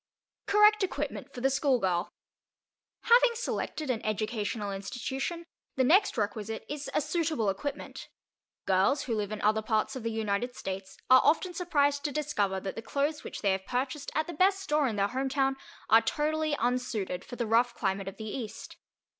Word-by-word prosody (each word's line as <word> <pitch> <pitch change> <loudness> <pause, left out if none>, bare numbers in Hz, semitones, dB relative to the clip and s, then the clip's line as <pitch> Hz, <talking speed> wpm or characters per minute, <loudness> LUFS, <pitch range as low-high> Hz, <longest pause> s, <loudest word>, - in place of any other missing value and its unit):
CORRECT 420 0 +5
EQUIPMENT 290 -5 -3
FOR 245 - -8
THE 270 +2 +3
SCHOOLGIRL 235 - +1 0.9
Having 475 +1 +5
selected 310 - -2
an 230 - -3
educational 215 -1 -2
institution, 265 - -4 0.3
the 260 - +2
next 370 +7 +4
requisite 215 +1 -3
is 290 -1 -5
a - - +3
suitable 305 - 0
equipment. 285 +9 -6 0.6
Girls 195 +10 +3
who 240 - -2
live 210 -2 -2
in 215 - -4
other 215 +1 +3
parts 220 +4 0
of 260 - -5
the 230 - -2
United 220 +2 -2
States 190 0 -6
are 255 - +9
often 345 +5 +2
surprised 290 -5 +1
to 295 - 0
discover 210 -10 0
that 190 0 -5
the - - -5
clothes 285 +6 -1
which - - -7
they 200 - +3
have 190 0 -2
purchased 265 +3 -2
at 310 - +1
the 345 - -6
best 385 +4 +3
store 300 -6 +1
in 225 - -2
their 200 0 +1
home 265 +2 -1
town 270 0 +1 0.3
are 225 +1 +7
totally 310 +2 0
unsuited 230 -7 -1
for - - -9
the 240 - -2
rough 230 +2 +2
climate 195 -1 -1
of 195 - -6
the 220 - -7
East. 220 0 -6
250 Hz, 180 wpm, -29 LUFS, 210-295 Hz, 0.9 s, are